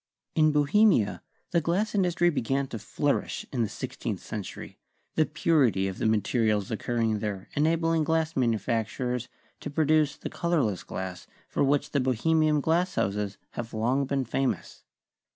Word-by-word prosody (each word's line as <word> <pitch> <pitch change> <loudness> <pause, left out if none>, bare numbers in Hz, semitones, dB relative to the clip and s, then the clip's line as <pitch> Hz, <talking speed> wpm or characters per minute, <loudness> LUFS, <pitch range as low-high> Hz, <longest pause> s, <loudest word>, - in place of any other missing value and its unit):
In 155 -1 +4
Bohemia, 150 - +3 0.3
the 170 -1 +3
glass 185 +7 0
industry 175 -3 +2
began 135 -1 0
to 115 - -5
flourish 140 +7 -1
in 125 - 0
the 110 - 0
sixteenth 110 -3 -4
century, 105 -4 -7 0.3
the 155 - +2
purity 145 - +2
of 95 - -5
the - - +1
materials 110 -1 +1
occurring 115 -1 0
there 100 -3 -4
enabling 165 +1 +2
glass 160 0 0
manufacturers 120 +1 -1 0.3
to - - -5
produce 155 0 +2
the - - -6
color 170 -4 +1
less 100 -4 -1
glass 95 -1 -6 0.2
for - - 0
which 140 +1 +1
the 140 - +2
Bohemian 150 +4 +2
glass 175 +5 +1
houses 100 0 -1
have 115 -1 -6
long 130 +5 +1
been 135 -1 0
famous. 135 +3 -2
135 Hz, 150 wpm, -27 LUFS, 110-160 Hz, 0.3 s, In